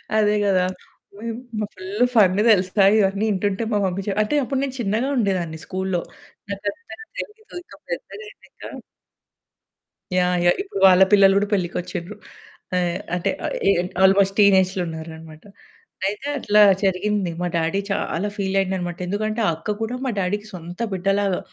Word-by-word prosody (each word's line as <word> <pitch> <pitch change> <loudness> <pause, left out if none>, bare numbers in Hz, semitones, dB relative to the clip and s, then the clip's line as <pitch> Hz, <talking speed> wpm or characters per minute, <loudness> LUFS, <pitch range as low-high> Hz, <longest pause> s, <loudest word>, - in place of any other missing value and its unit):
అదే 210 -1 +3
గదా! 190 -2 +3 1.0
మ - - -1
ఫుల్ 190 +3 -6
ఫన్ 190 -4 +5
తెలుసా, 195 -1 +3
ఇవన్నీ 200 0 +1
వింటుంటే, 200 +2 -1
మా 210 - +2
మమ్మీ 190 +1 -2
చే - - +1
అంటే 210 +8 -2
అప్పుడు 265 +1 -2
నేను 265 -2 -4
చిన్నగా 225 +5 0
ఉండేదాన్ని 180 -7 -1
స్కూల్లో. 190 -1 -2 0.5
నాకంతగా 205 - -5 0.2
తెల్దు. 435 -2 -8
ఇంక - - -16
పెద్దగా - - -6
అయ్యినంక 415 - -12 1.3
యాహ్! 180 0 +2
యాహ్! 175 - +4
ఇప్పుడు 385 - -6
వాళ్ళ 185 0 +7
పిల్లలు 195 -1 +6
కూడా 205 +1 +1
పెళ్ళికి 180 -3 -1
వచ్చిండ్రు. 180 +2 -7 0.6
ఆహ్, 175 0 0 0.2
అంటే 180 +2 -1 0.2
ఆహ్, - - -2
ఎ - - +7 0.3
ఆల్మోస్ట్ 195 0 +4
టీనేజ్‌లో 190 -2 +4
ఉన్నారన్నమాట. 160 -1 -9 0.6
అయితే 210 +8 -4
అట్లా 210 -5 +3 0.2
జరిగింది. 195 0 0
మా 180 - 0
డ్యాడీ 165 +4 0
చాలా 195 0 -1
ఫీలయిండన్నమాట. 190 -3 -1
ఎందుకంటే 215 +4 -2
ఆ - - +4
అక్క 165 +7 -3
కూడా 225 +2 -2
మా - - 0
డాడీకి 205 +3 -2
సొంత 175 0 -9
బిడ్డ 190 0 -4
లాగా. 195 -3 0
195 Hz, 150 wpm, -22 LUFS, 180-210 Hz, 1.3 s, వాళ్ళ